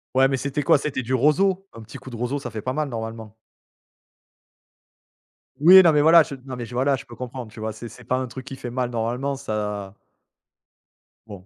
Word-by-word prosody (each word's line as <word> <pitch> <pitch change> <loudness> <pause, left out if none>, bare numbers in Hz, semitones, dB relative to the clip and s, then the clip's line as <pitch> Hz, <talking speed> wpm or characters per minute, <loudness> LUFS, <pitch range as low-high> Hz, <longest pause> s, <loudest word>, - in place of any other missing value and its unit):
Ouais, 135 +1 +5
mais 135 -1 -1
c'était 140 +2 -3
quoi? 145 - +4
C'était 140 -2 -3
du 130 +2 -1
roseau? 185 +9 +2
Un 115 - -11
petit 110 +5 -11
coup 130 0 -11
de - - -7
roseau, 125 +5 -2
ça 140 - -7
fait 110 -2 -6
pas 130 - -3
mal, 155 0 -1
normalement. 110 -2 -7 2.2
Oui, 185 +5 +9
non, 170 - +6
mais 150 - +4
voilà, 165 +1 +7
j 145 - -9
non, 130 -2 -6
mais 120 - -6
voilà, 130 +4 0
je 130 - -10
peux 120 - -12
comprendre, 125 -3 -7
tu 115 - -12
vois? 110 0 -3
C'est 115 +2 -9
c'est 120 +2 -14
pas 125 - 0
un 130 - -2
truc 130 +2 -9
qui 135 -2 -7
fait 125 -2 -7
mal, 125 0 -2
normalement, 120 +4 -2
ça 105 -6 -4 1.3
Bon. 100 -4 -11
130 Hz, 215 wpm, -23 LUFS, 115-140 Hz, 2.2 s, Oui